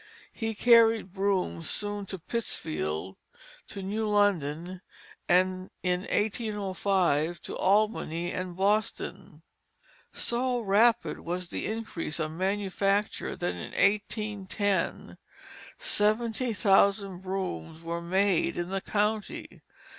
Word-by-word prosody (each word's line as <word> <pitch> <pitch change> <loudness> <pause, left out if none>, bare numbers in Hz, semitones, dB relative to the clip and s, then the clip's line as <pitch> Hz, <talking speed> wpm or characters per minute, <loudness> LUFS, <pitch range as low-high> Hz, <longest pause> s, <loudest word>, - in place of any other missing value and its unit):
He 225 -1 -3
carried 225 -4 +5
brooms 190 - 0
soon 205 -1 -3
to 190 - -5
Pittsfield, 95 - -3 0.5
to 195 - -7
New 215 +3 -1
London, 180 -4 +1 0.5
and 185 +1 +2
in 180 -1 +1
1805 195 -6 0
to - - -6
Albany 190 -4 +1
and 180 -1 -4
Boston. 210 +4 -1 0.7
So 245 +1 0
rapid 225 +3 +3
was 175 +1 -4
the - - -3
increase 215 -8 -4
of 155 -1 -1
manufacture 195 +3 0
that 175 - -2
in - - -7
1810 205 -1 0 0.6
seventy 230 - +1
thousand 195 0 +3
brooms 185 - -4
were 170 +1 -3
made 180 -1 +1
in 175 0 -2
the 195 0 0
county. 210 +1 -2
195 Hz, 100 wpm, -28 LUFS, 175-210 Hz, 0.7 s, carried